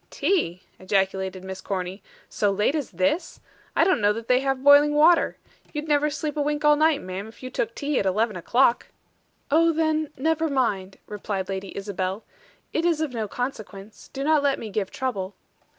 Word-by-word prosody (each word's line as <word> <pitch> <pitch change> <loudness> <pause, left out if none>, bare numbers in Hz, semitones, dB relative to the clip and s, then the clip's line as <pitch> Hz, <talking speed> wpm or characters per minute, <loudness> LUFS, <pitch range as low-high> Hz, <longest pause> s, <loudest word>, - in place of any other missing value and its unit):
"Tea!" 185 - 0 0.2
ejaculated 190 -1 -1
Miss 190 0 -7
Corny. 185 0 -4 0.3
"So 205 - 0
late 210 +6 +1
as 300 -5 -2
this! 190 - -1 0.4
I - - +5
don't 370 - +2
know 205 0 +4
that 230 +1 -7
they 250 0 +4
have 270 -1 -1
boiling 290 +1 +7
water. 325 +3 +4 0.4
You'd 300 0 -4
never 295 0 +2
sleep 295 0 -4
a 300 - 0
wink 295 +1 -1
all 295 0 +6
night, 310 -1 +2
ma'am, 185 +3 -6
if 225 - -15
you 255 - -6
took 230 -2 -2
tea 290 -1 -1
at - - -1
eleven 215 +3 +1
o'clock." 235 +7 +2 0.6
"Oh, 330 +2 +5
then, 315 -1 0
never 320 +3 0
mind," 205 -9 -1
replied 200 -2 -4
Lady 190 0 -5
Isabel. 195 0 -3 0.5
"It 325 - 0
is 340 -3 +2
of 310 -5 -2
no 220 -3 -2
consequence. 215 -4 -6
Do 275 - -4
not 305 0 +3
let 280 -1 +1
me 220 - -7
give 195 -2 -2
trouble." 205 -7 -4
245 Hz, 185 wpm, -24 LUFS, 195-295 Hz, 0.6 s, boiling